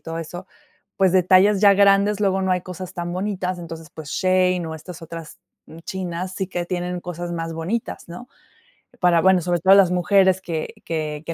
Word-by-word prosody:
todo 165 0 -6
eso, 175 +3 -7 0.5
pues, 190 -2 +3
detalles 190 +2 +4
ya 200 -1 +6
grandes, 200 +1 +4
luego 195 -1 +1
no 190 - 0
hay 180 -1 +1
cosas 185 0 -8
tan 175 0 -4
bonitas. 185 -1 -3
Entonces, 165 -2 -9
pues, 155 -2 -10
Shein 185 -1 +1
o 160 - -5
estas 160 +2 -10
otras 165 -1 -9 0.5
chinas 185 0 -5
sí 190 - -3
que 175 -2 -4
tienen 180 0 -3
cosas 175 0 -6
más 165 -1 -4
bonitas, 175 +5 -4
¿no? 180 +9 -10 0.7
Para, 175 -2 +4
bueno, 190 -1 +4
sobre 175 0 0
todo 190 +3 +6
las 195 -3 +5
mujeres 190 +1 +3
que 165 -4 -4
que 155 -2 -3
que 165 - -4
180 Hz, 185 wpm, -22 LUFS, 170-190 Hz, 0.7 s, ya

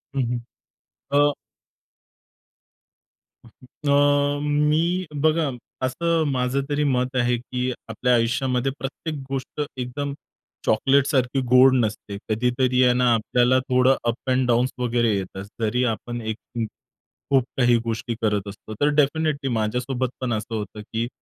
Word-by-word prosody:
हं, 135 - +1
हं, 120 -1 -2 0.8
अ 145 0 +5 2.2
का, 120 - -20
की 145 +3 -6
अ, 145 0 +3
मी 150 +5 +1 0.2
बघा 155 -1 +2 0.4
असं 165 +5 +1
माझं 130 +1 0
तरी 145 0 +1
मत 130 -2 0
आहे, 120 0 +2
की 125 +1 -3 0.2
आपल्या 125 +3 +1
आयुष्यामध्ये 125 +3 +1
प्रत्येक 150 +3 -5
गोष्ट 135 +2 -4 0.2
एकदम 135 +3 -3 0.5
चॉकलेटसारखी 135 +2 +2
गोड 130 +1 +7
नसते. 105 -4 -1
कधीतरी 125 +3 +2
आहे 125 - +5
ना, 125 -1 +3
आपल्याला 125 +3 +2
थोडं 130 0 +3
अप 120 +2 -2
एंड 130 0 +2
डाउन्स 120 +2 +2
वगैरे 120 -3 +1
येतात. 95 0 -6 0.2
जरी 125 +3 +1
आपण 120 +1 -7
एक 110 0 -4 0.2
हं. 115 - 0 0.7
खूप 135 -2 +5
काही 120 -2 +4
गोष्टी 115 +1 -3
करत 105 -2 0
असतो, 105 +2 -9
तर 145 - +4
डेफिनेटली 150 -1 +1
माझ्यासोबत 125 +3 -1
पण 120 -3 -1
असं 110 +1 -3
होतं, 105 0 -5
की 115 +2 -3
125 Hz, 135 wpm, -23 LUFS, 120-140 Hz, 2.2 s, गोड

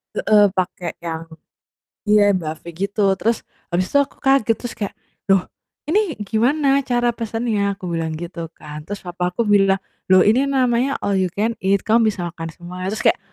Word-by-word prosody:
Heeh, 210 -1 +5
pakai 180 -2 -2
yang 165 -1 -5 0.8
iya, 210 -1 +5
buffet 170 -3 -3
gitu, 200 +1 +1
terus 230 0 0 0.3
habis 185 +1 0
itu 285 - +4
aku 280 0 -1
kaget 270 -4 +3
terus 245 +1 -7
kayak, 205 -2 -3 0.3
"Loh 195 -2 +4 0.5
ini 395 -3 +2
gimana 270 +7 +2
cara 240 -1 +2
pesannya?" 225 -3 -1
Aku 190 -3 -7
bilang 165 -1 -2
gitu 170 +1 -6
kan, 150 +1 -10
terus 205 0 -6
papaku 180 +3 -2
bilang, 195 -3 +3 0.2
"Loh 185 0 +6
ini 250 +6 +3
namanya 260 -1 +1
all 200 -1 +1
you 185 - +2
can 225 +3 -1
eat 195 0 +1
kamu 225 +1 +3
bisa 175 -4 -4
makan 165 -1 -7
semuanya," 180 +1 -7
terus 220 - -4
kayak - - +3
200 Hz, 170 wpm, -20 LUFS, 180-230 Hz, 0.8 s, Loh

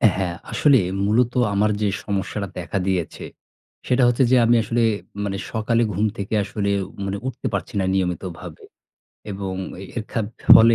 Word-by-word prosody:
হ্যাঁ, 90 -3 -2 0.2
আসলে 140 -4 +5 0.3
মূলত 120 +4 +2 0.2
আমার 105 +2 +2
যে 105 - +2 0.2
সমস্যাটা 100 0 -2
দেখা 90 +3 -3
দিয়েছে, 90 -3 -2 0.6
সেটা 125 0 +3
হচ্ছে 120 +2 +3
যে, - - +7
আমি 120 - +5
আসলে 115 +2 +1 0.4
মানে 100 -1 -2
সকালে 115 +1 +1
ঘুম 105 +4 +1
থেকে 100 +2 -4
আসলে 100 0 -2 0.2
উ - - -10 0.2
মানে 100 +1 -2
উঠতে 130 -2 -4
পারছি - - -3
না 95 - +1
নিয়মিতভাবে 90 -2 -3 0.7
এবং 95 -1 -4 0.4
এর 115 - -1
খাব 110 - 0 0.3
ফলে 115 +1 +8
100 Hz, 155 wpm, -22 LUFS, 95-115 Hz, 0.7 s, ফলে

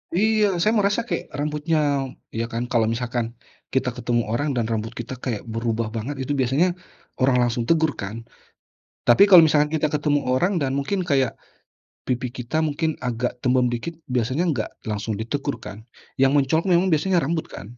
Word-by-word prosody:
Iya, 210 -1 +3
saya 215 - +3
merasa 205 +3 +1
kayak 240 - -5
rambutnya 150 +2 -1 0.6
iya 115 +1 -1
kan, 115 +1 -3
kalau 115 -3 +3
misalkan 120 0 -2 0.5
kita 130 -1 +1
ketemu 120 0 0
orang 145 +6 0
dan 120 - +1
rambut 110 +1 -2
kita 120 +2 -5
kayak 115 -6 -3
berubah 115 -1 -1
banget, 120 +6 -3
itu 135 - -4
biasanya 135 +8 +3 0.5
orang 130 -1 +3
langsung 120 0 0
tegur 160 -2 +3
kan. 100 +2 -5 0.9
Tapi 120 +11 +7
kalau 180 -3 +10
misalkan 150 -1 +3
kita 155 0 +1
ketemu 145 0 +2
orang 180 +8 +1
dan 135 -1 0
mungkin 140 +8 -1
kayak 135 -4 +1 0.7
pipi 125 0 -1
kita 125 +5 -3
mungkin 155 +1 -1
agak 125 0 -3
tembem 125 -1 +3
dikit, 120 +8 -4 0.2
biasanya 125 +6 0
nggak 120 -8 -1 0.2
langsung 105 +1 -2
ditegur 140 +4 -2
kan, 100 - -8 0.4
yang 135 +1 +4
mencolok 145 +5 +2
memang 180 +2 +3
biasanya 175 +2 +2
rambut 160 +3 -1
kan? 115 +5 -10
130 Hz, 170 wpm, -23 LUFS, 120-155 Hz, 0.9 s, kalau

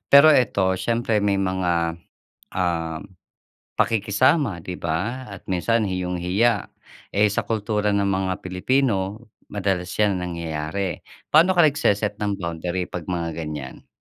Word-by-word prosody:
Pero 140 +2 +8
ito 100 -8 +3
siyempre 115 -2 +1
may 100 -1 +2
mga, 85 -3 0 0.5
uhm, 85 0 -2 0.6
pakikisama 105 - +2
'di 90 - -5
ba 95 +11 -2
at 100 -2 -10
minsan 110 +5 +1
iyong 90 -1 -2
hiya, 100 +5 +2 0.5
eh, 105 +1 +4
sa 100 - -1
kultura 105 -1 0
ng 100 -1 +1
mga 95 -1 0
Pilipino 100 +2 0 0.2
madalas 95 -3 -1
yan 105 -3 +2
nangyayari. 85 +1 -3 0.3
Paano 165 +5 +6
ka 175 - +4
nagse-set 105 -9 +2
ng 100 -2 -2
boundary 85 +2 -3
'pag 85 - -5
mga 85 -3 -3
ganyan? 75 -4 -7
95 Hz, 130 wpm, -23 LUFS, 90-110 Hz, 0.6 s, Pero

